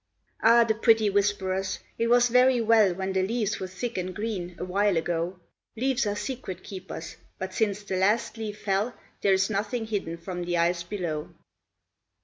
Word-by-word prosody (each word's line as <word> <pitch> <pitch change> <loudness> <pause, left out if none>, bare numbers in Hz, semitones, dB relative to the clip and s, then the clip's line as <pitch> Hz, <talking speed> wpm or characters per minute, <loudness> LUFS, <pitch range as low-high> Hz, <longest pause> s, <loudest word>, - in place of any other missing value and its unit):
Ah, 235 +1 +7
the 225 -1 +1
pretty 220 -1 +4
whisperers! 195 -1 0 0.2
It 230 - +2
was 245 +1 +5
very 250 +1 +5
well 220 -5 +4
When 190 +1 -3
the 190 - +2
leaves 215 +1 -1
were 190 - -4
thick 205 +3 -4
and 185 0 -4
green, 200 -5 -4
awhile 190 +1 +1
ago 170 +2 -2 0.4
Leaves 260 -1 +1
are 205 - -1
secret 240 -4 -5
keepers; 185 -4 -8 0.2
but 190 0 -5
since 205 -1 0
the 190 -2 -3
last 210 +4 +2
leaf 215 -2 -5
fell 205 +4 0 0.3
There 195 - +4
is 195 +2 +2
nothing 220 +3 -1
hidden 195 -6 -3
from 175 +1 -5
the 175 0 0
eyes 170 +1 +2
below. 170 -5 -4
200 Hz, 170 wpm, -27 LUFS, 185-225 Hz, 0.4 s, Ah